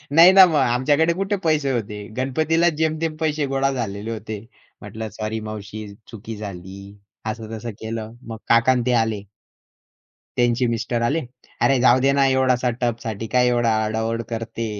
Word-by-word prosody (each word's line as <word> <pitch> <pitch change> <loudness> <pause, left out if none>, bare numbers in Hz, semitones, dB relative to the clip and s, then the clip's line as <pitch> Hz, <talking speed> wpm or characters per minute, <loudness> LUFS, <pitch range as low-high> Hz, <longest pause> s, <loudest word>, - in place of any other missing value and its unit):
नाही 170 +3 +9
ना 190 0 +9
मग 170 -3 0
आमच्याकडे 145 +5 +2
कुठे 195 +3 -1
पैसे 150 -4 +2
होते. 105 -3 -4
गणपतीलाच 160 +6 +1
जेमतेम 160 0 0
पैसे 155 -2 0
गोळा 135 0 +1
झालेले 110 -4 -4
होते. 110 -1 -5 0.4
म्हटलं 110 0 -6
"सॉरी 110 +1 -3
मावशी 110 0 -7 0.3
चुकी 115 0 -8
झाली." 95 -2 -8 0.5
असं 110 0 -8
तसं 115 +2 -6
केलं. 110 0 -5
मग 115 -1 -6
काका 115 +2 +5
अन् 125 -2 0
ते 125 - +3
आले. 105 -3 -4 1.1
त्यांचे 120 +1 +2
मिस्टर 115 0 -1
आले, 145 +8 +1 0.4
"अरे 135 -1 +3
जाऊदे 130 +2 +4
ना. 140 0 +3
एवढासा 130 -2 +2
टबसाठी 115 -3 -2
काय 125 0 +4
एवढा 120 -1 +2
आरडा-ओरड 110 +1 -2
करते." 115 0 -4
120 Hz, 155 wpm, -22 LUFS, 110-135 Hz, 1.1 s, नाही